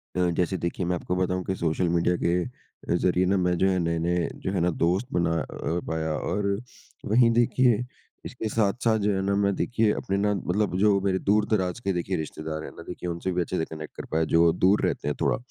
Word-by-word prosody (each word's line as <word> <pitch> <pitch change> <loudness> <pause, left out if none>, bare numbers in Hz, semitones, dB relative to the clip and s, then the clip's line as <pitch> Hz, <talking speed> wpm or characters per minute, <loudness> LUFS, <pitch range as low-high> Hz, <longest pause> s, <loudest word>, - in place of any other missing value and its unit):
अ, 90 -1 +2
जैसे 90 +1 +1
देखिए 85 +1 -2
मैं 90 +1 0
आपको 90 +1 -3
बताऊँ 90 0 0
कि 95 - -1
सोशल 85 +1 0
मीडिया 85 +1 +2
के 85 +1 +1
अ, 125 -6 -7
ज़रिए 90 +1 +2
ना 95 +2 +2
मैं 90 -1 +1
जो 95 +3 +3
है 95 - +1
नए-नए 85 +1 0 0.2
जो 95 - 0
है 95 - 0
ना 90 - +3
दोस्त 90 +8 +1
बना 85 -1 +1
अ, 85 +2 -3
पाया। 80 -1 -1
और 100 +4 -2 0.6
वहीं 115 +2 +4
देखिए 120 0 +3 0.4
इसके 110 -4 -4
साथ-साथ 110 +1 +1
जो 105 0 +1
है 95 - 0
ना 100 +1 0
मैं 100 0 +2
देखिए 115 -1 +1
अपने 95 - -2
ना 105 +1 +2
मतलब 100 0 -1
जो 100 0 +4
मेरे 95 -1 +1
दूर-दराज़ 105 -1 +1
के 100 -4 -1
देखिए 90 +2 -2
रिश्तेदार 80 0 -5
हैं - - -7
ना 85 - -8
देखिए 90 0 -5
उनसे 85 +2 -3
भी 90 0 0
अच्छे 90 +2 -2
से 80 - 0
कनेक्ट 80 -1 -9
कर - - -6
पाया 80 +1 +2
जो 85 0 +6
दूर 95 +3 +5
रहते - - -2
हैं 75 - 0
थोड़ा। - - +2
90 Hz, 225 wpm, -26 LUFS, 85-100 Hz, 0.6 s, जो